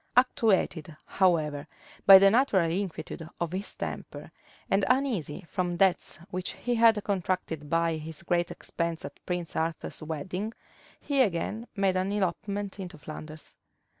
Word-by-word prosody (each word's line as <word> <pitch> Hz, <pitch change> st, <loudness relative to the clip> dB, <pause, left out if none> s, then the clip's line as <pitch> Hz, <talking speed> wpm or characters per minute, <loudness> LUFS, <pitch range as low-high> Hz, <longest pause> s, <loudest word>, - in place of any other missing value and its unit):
Actuated, 190 Hz, -, +2 dB
however, 155 Hz, -6 st, +1 dB, 0.4 s
by 195 Hz, -1 st, +13 dB
the 195 Hz, +1 st, +6 dB
natural 215 Hz, -8 st, +3 dB
inquietude 175 Hz, -3 st, -4 dB
of 170 Hz, -1 st, -2 dB
his 190 Hz, +3 st, -4 dB
temper -, -, -6 dB, 0.4 s
and 195 Hz, +1 st, +2 dB
uneasy 245 Hz, -, 0 dB
from 180 Hz, -1 st, -2 dB
debts 190 Hz, -1 st, +2 dB
which 185 Hz, 0 st, -2 dB
he 245 Hz, -, -2 dB
had 225 Hz, -3 st, +5 dB
contracted 180 Hz, -6 st, -2 dB
by 165 Hz, 0 st, +1 dB
his 155 Hz, +1 st, -8 dB
great 175 Hz, 0 st, +1 dB
expense 170 Hz, -1 st, -4 dB
at -, -, -10 dB
Prince 175 Hz, -2 st, -3 dB
Arthur's 165 Hz, +1 st, -3 dB
wedding, 180 Hz, +8 st, -4 dB, 0.5 s
he 280 Hz, -2 st, +1 dB
again 215 Hz, +2 st, 0 dB
made 195 Hz, -2 st, +2 dB
an 185 Hz, +1 st, 0 dB
elopement 200 Hz, +1 st, -2 dB
into 180 Hz, -3 st, -7 dB
Flanders. 155 Hz, +1 st, -9 dB
185 Hz, 135 wpm, -28 LUFS, 165-200 Hz, 0.5 s, by